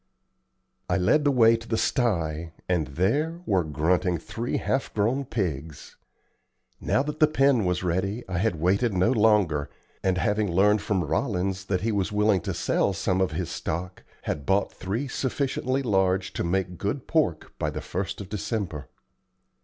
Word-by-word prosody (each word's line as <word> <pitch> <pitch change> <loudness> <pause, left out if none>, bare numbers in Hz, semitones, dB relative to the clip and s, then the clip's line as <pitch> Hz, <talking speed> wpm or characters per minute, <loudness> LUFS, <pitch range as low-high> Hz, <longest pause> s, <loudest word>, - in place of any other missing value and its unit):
I - - +2
led 145 +12 +3
the 145 - +5
way 115 -3 +5
to 115 0 -8
the 115 - 0
sty, 85 - 0
and 85 -5 +1
there 130 - 0
were 95 - +2
grunting 85 +4 +1
three 110 +8 -3
half 135 - -1
grown 120 +7 +1
pigs. 80 - -4 0.8
Now 135 - +1
that 150 +1 -5
the 155 - +6
pen 135 -7 +3
was 90 0 0
ready 95 +6 -1
I 90 -2 -2
had 100 -5 0
waited 100 +6 +2
no 90 +6 +3
longer, 105 - +3 0.3
and, 95 -1 +1
having 105 +2 +1
learned 105 +4 +4
from 95 -3 0
Rollins 95 - -1
that 95 -2 -1
he 115 +3 0
was 100 -1 0
willing 105 -2 +2
to - - -3
sell 100 - +1
some 95 0 0
of 95 - 0
his 90 -4 -3
stock, 90 +3 -4 0.2
had 75 - -3
bought 100 +1 +2
three 110 +10 -3
sufficiently 135 0 -1
large 95 -4 +1
to - - -2
make 90 0 -1
good 125 +7 -2
pork 150 - 0
by - - 0
the - - -5
1st 95 +2 -4
of 100 - -7
December. 100 - -3
95 Hz, 170 wpm, -26 LUFS, 90-115 Hz, 0.8 s, the